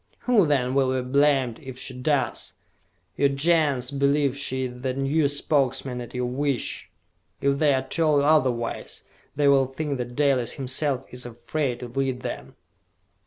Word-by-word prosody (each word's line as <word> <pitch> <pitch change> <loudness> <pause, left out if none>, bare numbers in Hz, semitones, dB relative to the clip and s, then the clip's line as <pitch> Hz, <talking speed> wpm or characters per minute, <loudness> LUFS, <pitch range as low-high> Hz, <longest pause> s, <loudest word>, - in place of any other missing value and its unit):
"Who, 225 -9 +3
then, 130 -3 +1
will 130 -1 +2
be 125 - -5
blamed 135 -3 +2
if 130 -3 -9
she 130 0 -5
does? 135 +2 -1 0.6
Your 140 0 +3
Gens 140 -3 +1
believe 140 0 +2
she 130 -2 -2
is 125 -1 -6
their 130 -1 -2
new 140 +3 +1
Spokesman 135 -3 0
at 120 - -9
your 125 0 -1
wish! 135 +1 -2 0.5
If 140 0 +1
they 145 -3 +4
are 130 0 -2
told 155 -4 +2
otherwise, 130 -6 0 0.3
they 145 0 +2
will 135 -1 +5
think 140 0 -4
that 120 0 -5
Dalis 135 -5 +2
himself 135 0 -2
is 125 0 -5
afraid 120 +2 -3
to 125 - -5
lead 130 +1 -2
them!" - - -6
135 Hz, 160 wpm, -25 LUFS, 125-145 Hz, 0.6 s, will